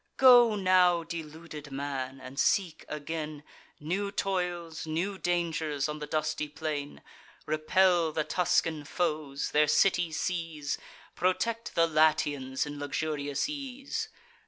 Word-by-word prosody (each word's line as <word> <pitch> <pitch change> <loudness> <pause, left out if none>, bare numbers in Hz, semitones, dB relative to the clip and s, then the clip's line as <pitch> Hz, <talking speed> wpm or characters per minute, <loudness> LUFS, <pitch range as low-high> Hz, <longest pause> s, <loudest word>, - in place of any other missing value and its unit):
Go 245 -4 +8
now, 185 -3 +4
deluded 160 -2 -8
man, 135 -1 -4
and 130 +2 -8
seek 180 -6 +1
again 150 0 -5 0.4
New 195 +7 -2
toils, 175 -5 -2
new 185 +5 -2
dangers, 160 -5 0
on 150 0 -5
the 150 - -5
dusty 155 -1 -1
plain. 150 -1 -4 0.4
Repel 165 +2 +3
the 155 0 0
Tuscan 165 -3 +1
foes; 150 -3 -2
their 150 0 +4
city 175 0 +3
seize; 160 -3 -2 0.3
Protect 205 +6 -1
the 165 - +5
Latians 155 -4 +2
in 145 -1 -7
luxurious 145 - -2
ease. 275 -2 -5
160 Hz, 115 wpm, -29 LUFS, 150-180 Hz, 0.4 s, Go